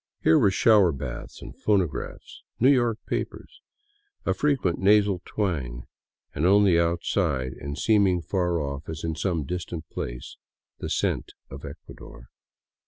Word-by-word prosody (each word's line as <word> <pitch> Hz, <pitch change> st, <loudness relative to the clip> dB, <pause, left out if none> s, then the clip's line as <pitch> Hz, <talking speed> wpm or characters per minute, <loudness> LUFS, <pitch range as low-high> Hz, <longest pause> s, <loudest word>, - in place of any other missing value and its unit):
Here 80 Hz, -, +5 dB
were 100 Hz, -, +5 dB
shower 100 Hz, -1 st, +5 dB
baths 65 Hz, -4 st, -7 dB
and -, -, -10 dB
phonographs, 95 Hz, -7 st, -2 dB, 0.2 s
New 130 Hz, +4 st, +6 dB
York 120 Hz, -5 st, +2 dB
papers, -, -, -5 dB, 0.6 s
a -, -, +2 dB
frequent 135 Hz, -, 0 dB
nasal 100 Hz, -2 st, +4 dB
twang, 70 Hz, -, -2 dB, 0.5 s
and 75 Hz, -, -3 dB
only 95 Hz, -1 st, +5 dB
outside 85 Hz, -5 st, 0 dB
and 70 Hz, +1 st, -5 dB
seeming 100 Hz, -5 st, +3 dB
far 90 Hz, -3 st, 0 dB
off 70 Hz, -1 st, -5 dB
as 80 Hz, 0 st, -6 dB
in 80 Hz, -1 st, -1 dB
some 85 Hz, -1 st, -1 dB
distant 85 Hz, +1 st, -5 dB
place, -, -, -6 dB, 0.4 s
the -, -, -4 dB
scent -, -, -1 dB, 0.2 s
of 70 Hz, +1 st, -9 dB
Ecuador. 70 Hz, -4 st, -12 dB
85 Hz, 135 wpm, -26 LUFS, 70-100 Hz, 0.6 s, New